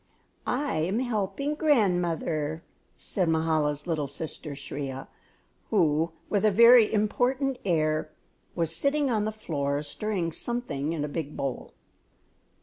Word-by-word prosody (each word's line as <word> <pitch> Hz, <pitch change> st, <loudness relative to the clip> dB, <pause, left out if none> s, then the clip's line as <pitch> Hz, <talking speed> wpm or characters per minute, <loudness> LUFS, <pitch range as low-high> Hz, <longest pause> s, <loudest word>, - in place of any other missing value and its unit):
"I 275 Hz, -, 0 dB
am 180 Hz, +7 st, 0 dB
helping 245 Hz, +4 st, -1 dB
grandmother," 175 Hz, -, +1 dB, 0.3 s
said 180 Hz, -4 st, 0 dB
Mahala's 155 Hz, -2 st, +1 dB
little 155 Hz, -5 st, -1 dB
sister 150 Hz, +1 st, -6 dB
Shriya, 135 Hz, -1 st, -6 dB, 0.6 s
who, 165 Hz, -5 st, +2 dB, 0.2 s
with 205 Hz, -1 st, 0 dB
a 215 Hz, -, +6 dB
very 235 Hz, +2 st, +7 dB
important 250 Hz, +5 st, +1 dB
air, 155 Hz, -4 st, +1 dB, 0.5 s
was 165 Hz, -2 st, 0 dB
sitting 280 Hz, -, +1 dB
on 215 Hz, -2 st, +1 dB
the 215 Hz, -, -1 dB
floor 145 Hz, -9 st, -2 dB
stirring 175 Hz, +3 st, -2 dB
something 165 Hz, -, -3 dB
in 150 Hz, -3 st, -2 dB
a -, -, -3 dB
big 150 Hz, 0 st, -5 dB
bowl. 135 Hz, -3 st, -4 dB
170 Hz, 125 wpm, -27 LUFS, 150-220 Hz, 0.6 s, very